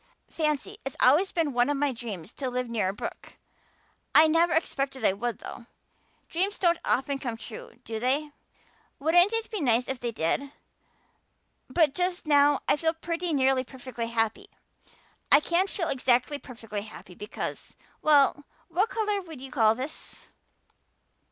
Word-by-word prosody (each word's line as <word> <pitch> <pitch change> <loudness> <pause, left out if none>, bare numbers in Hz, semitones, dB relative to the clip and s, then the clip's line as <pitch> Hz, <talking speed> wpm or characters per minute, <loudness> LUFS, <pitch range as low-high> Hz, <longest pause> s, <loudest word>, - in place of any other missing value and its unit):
"Fancy. 310 +6 -2
It's 270 - -5
always 305 +10 +4
been 320 -5 0
one 245 +2 +2
of 290 - 0
my 285 0 +1
dreams 215 -6 -7
to 265 -2 -3
live 250 0 -2
near 220 -5 0
a - - -3
brook. 205 - -8 0.8
I 310 - +9
never 330 +2 +3
expected 275 -6 -1
I 190 - +4
would, 230 +2 -3
though. 235 - -10 0.6
Dreams 385 +5 -1
don't 345 -2 +2
often 275 +1 0
come 240 -4 -4
true, 225 0 -9
do 225 -2 -4
they? 280 +5 0 0.7
Wouldn't 350 +6 +4
it 455 +1 -2
be 425 -5 -3
nice 245 -2 +2
if 265 -2 -3
they 240 -1 -2
did? 230 - -1 1.2
But 300 +1 +3
just 360 +2 -1
now 290 -1 +4
I - - +3
feel 320 +1 +1
pretty 335 +1 -3
nearly 265 -2 +2
perfectly 255 -2 -6
happy. 225 -1 -1 0.8
I 285 - +9
can't 345 +5 +1
feel 340 -4 -2
exactly 255 +2 +2
perfectly 225 -6 -7
happy 205 -3 -11
because 205 +4 -6 0.3
well, 290 -1 +4 0.2
what 380 +7 +1
color 420 -4 -1
would 325 -6 -10
you 265 0 -9
call 220 -3 +4
this?" 265 +6 -8
275 Hz, 160 wpm, -27 LUFS, 240-330 Hz, 1.2 s, I